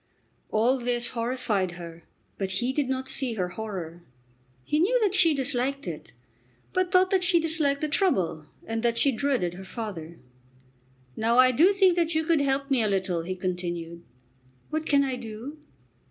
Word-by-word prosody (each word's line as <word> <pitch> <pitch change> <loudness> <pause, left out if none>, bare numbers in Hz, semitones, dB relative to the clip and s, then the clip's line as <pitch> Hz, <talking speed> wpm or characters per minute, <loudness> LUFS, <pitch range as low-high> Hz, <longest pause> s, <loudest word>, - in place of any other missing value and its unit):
All 240 +5 +2
this 240 0 0
horrified 230 -6 -1
her, 170 -1 -9 0.4
but 195 -1 -1
he 245 +7 0
did 280 -2 0
not 260 0 -2
see 255 -4 -2
her 180 -4 -1
horror. 175 -5 -6 0.6
He 300 - 0
knew 465 +9 +3
that 400 -3 +2
she 340 -5 +4
disliked 275 +1 -1
it, - - -7 0.6
but 370 -2 +1
thought 370 0 +4
that 380 -2 +2
she 360 -1 +3
disliked 310 -4 0
the 305 - 0
trouble, 190 - 0 0.2
and 225 0 -2
that 235 0 +1
she 275 - +3
dreaded 245 -8 0
her 190 +2 -9
father. 185 -6 -7 1.0
"Now 230 +2 +1
I 255 0 +7
do 330 +10 +5
think 385 -3 +4
that 335 -1 +1
you 315 - +2
could 325 -2 +2
help 275 0 0
me 260 -3 +3
a 215 - +1
little," 185 -3 0
he 185 +3 -4
continued. 175 -2 -4 0.7
"What 315 0 -2
can 280 -1 +4
I 260 -2 -2
do?" 240 +6 -8
250 Hz, 175 wpm, -26 LUFS, 190-300 Hz, 1.0 s, I